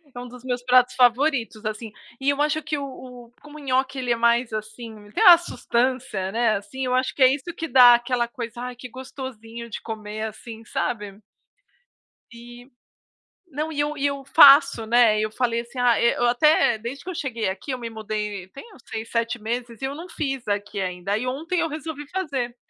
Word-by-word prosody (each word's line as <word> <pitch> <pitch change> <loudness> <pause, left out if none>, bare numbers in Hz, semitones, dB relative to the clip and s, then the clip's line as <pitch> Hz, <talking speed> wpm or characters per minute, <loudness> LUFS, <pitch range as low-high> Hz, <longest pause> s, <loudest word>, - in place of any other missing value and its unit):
É - - -6
um 245 - -7
dos 250 0 -13
meus 250 -1 -3
pratos 250 0 +4
favoritos, 245 -3 +2
assim, 215 +1 -5 0.3
e 270 - +1
eu 285 0 0
acho 305 +1 +1
que 310 -1 -3
o 285 - -4
o 250 -3 -10
como 295 0 -13
o - - -11
nhoque, 265 0 0
ele 250 -2 -2
é - - +3
mais, 235 0 +2
assim, 215 -1 -8
tem 440 - 0
uma 355 -4 +10
sustância, 245 - -2
né, 230 0 +2
assim, 260 +6 -6
eu 250 - -1
acho 255 +1 0
que 270 - +3
é 260 0 +6
isso 280 -1 -5
que 325 - -4
dá 245 -3 +8
aquela 240 0 -1
coisa: 235 0 -7
"Ai, 250 0 -5
que 250 +1 -10
gostosinho 235 -3 -9
de - - -6
comer, 215 -1 -6
assim, 220 +1 -10
sabe." 205 -3 -4 1.1
E, 240 +2 -13 0.8
não, 305 0 -4
e 290 - -2
eu 295 +1 -1
e 285 0 0
eu 280 -1 -3
faço, 275 -4 +7
né. 230 -2 +4
E - - 0
eu 215 - -2
falei 235 0 -1
assim: 240 +2 -11
"Ah, 245 -2 +3
eh, 235 - +3
eu 240 - +1
até 240 -1 +3
desde 235 +5 -7
que 370 - -5
eu - - -6
cheguei 235 - -3
aqui, 190 +9 -5
eu 255 - -2
me 235 -1 -5
mudei, 210 -3 -5
tem 275 - -12
uns 250 - -18
6, 220 +1 -6
7 230 +1 -1
meses 235 +1 -5
e - - -5
eu 270 +1 -3
não 335 +5 -9
fiz 270 -7 -4
aqui 205 0 -2
ainda." 180 +1 -3
Aí 220 +5 -1
ontem 320 +8 -2
eu 330 - 0
resolvi 305 -1 -6
fazer. 275 -10 -3
245 Hz, 215 wpm, -23 LUFS, 225-270 Hz, 1.1 s, uma